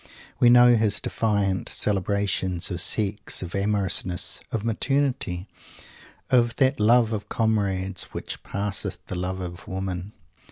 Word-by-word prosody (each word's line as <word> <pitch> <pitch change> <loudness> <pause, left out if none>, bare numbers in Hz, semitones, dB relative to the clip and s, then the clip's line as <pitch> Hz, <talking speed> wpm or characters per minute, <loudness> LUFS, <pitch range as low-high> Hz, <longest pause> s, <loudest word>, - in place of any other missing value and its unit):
We 120 - +6
know 120 0 +7
his 110 -2 +2
defiant 100 -4 -1
celebrations 95 -2 0
of 90 -1 -2
Sex, 105 0 +1
of 85 - -7
amorousness, 100 -3 +1
of 110 -1 -3
maternity; 115 -6 -1 0.8
of 120 -2 +3
that 135 0 +2
Love 115 +1 +4
of 105 -2 -4
Comrades 100 -4 0
which - - -7
"passeth 100 -1 -4
the - - -6
love 95 +1 -3
of 90 -1 -7
women." 95 +1 -5
100 Hz, 125 wpm, -24 LUFS, 95-115 Hz, 0.8 s, know